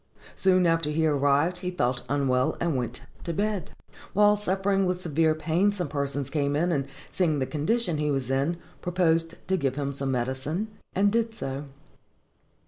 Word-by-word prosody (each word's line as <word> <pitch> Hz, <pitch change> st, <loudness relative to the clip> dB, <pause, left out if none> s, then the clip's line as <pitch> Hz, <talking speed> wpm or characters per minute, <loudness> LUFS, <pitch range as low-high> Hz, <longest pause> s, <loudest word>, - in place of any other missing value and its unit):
Soon 185 Hz, -1 st, +3 dB
after 165 Hz, -2 st, +2 dB
he 160 Hz, +1 st, +1 dB
arrived 145 Hz, +4 st, +2 dB
he 180 Hz, 0 st, -3 dB
felt 125 Hz, -8 st, 0 dB
unwell, 130 Hz, -2 st, +1 dB
and 170 Hz, -4 st, 0 dB
went 125 Hz, -1 st, -3 dB, 0.2 s
to 170 Hz, -, -3 dB
bed. 205 Hz, 0 st, -1 dB, 0.4 s
While 210 Hz, +1 st, +5 dB
suffering 195 Hz, -1 st, +1 dB
with 180 Hz, 0 st, -1 dB
severe 160 Hz, -2 st, +2 dB
pain, 170 Hz, +6 st, +2 dB
some 180 Hz, -6 st, -3 dB
persons 140 Hz, -1 st, -2 dB
came 145 Hz, -1 st, 0 dB
in, 170 Hz, +4 st, +1 dB
and, 140 Hz, -4 st, 0 dB, 0.2 s
seeing 165 Hz, -5 st, +1 dB
the 135 Hz, -, 0 dB
condition 165 Hz, -, 0 dB
he 150 Hz, 0 st, 0 dB
was 135 Hz, -3 st, -1 dB
in, 140 Hz, +6 st, +1 dB, 0.2 s
proposed 165 Hz, -2 st, +1 dB
to 190 Hz, 0 st, +2 dB
give 135 Hz, -5 st, 0 dB
him 140 Hz, -1 st, -2 dB
some 135 Hz, 0 st, -3 dB
medicine, 130 Hz, -, -2 dB, 0.3 s
and 200 Hz, +1 st, +3 dB
did 230 Hz, 0 st, 0 dB
so. 135 Hz, -5 st, -4 dB
160 Hz, 170 wpm, -27 LUFS, 140-185 Hz, 0.4 s, While